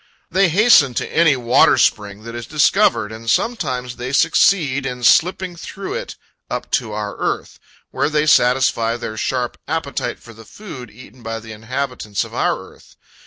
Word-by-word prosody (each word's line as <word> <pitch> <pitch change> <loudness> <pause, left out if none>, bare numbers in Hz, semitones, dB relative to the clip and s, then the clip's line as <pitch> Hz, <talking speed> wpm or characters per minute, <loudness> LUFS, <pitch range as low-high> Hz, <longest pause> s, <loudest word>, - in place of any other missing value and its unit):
They 190 +1 +3
hasten 165 - +5
to - - -2
any 160 -4 +4
waterspring 110 -4 +2
that 115 0 -8
is 120 -1 -7
discovered, 150 - +2
and 115 +1 -7
sometimes 130 - -1
they 125 +2 -5
succeed 140 -3 +3
in 125 -2 -5
slipping 180 +7 +3
through 195 - -7
it - - -5 0.3
up - - -5
to 115 -5 0
our 105 -1 -4
earth, - - -3 0.3
where 140 +3 0
they 150 0 +1
satisfy 120 -4 +3
their 110 -2 -6
sharp 125 +2 -2
appetite 140 -6 -3
for 115 - -14
the 115 +1 -14
food 130 - -10
eaten 120 +2 -16
by 115 0 -5
the 115 0 -11
inhabitants 110 -1 -4
of - - -11
our - - 0
earth. - - -21
125 Hz, 165 wpm, -19 LUFS, 115-155 Hz, 0.3 s, hasten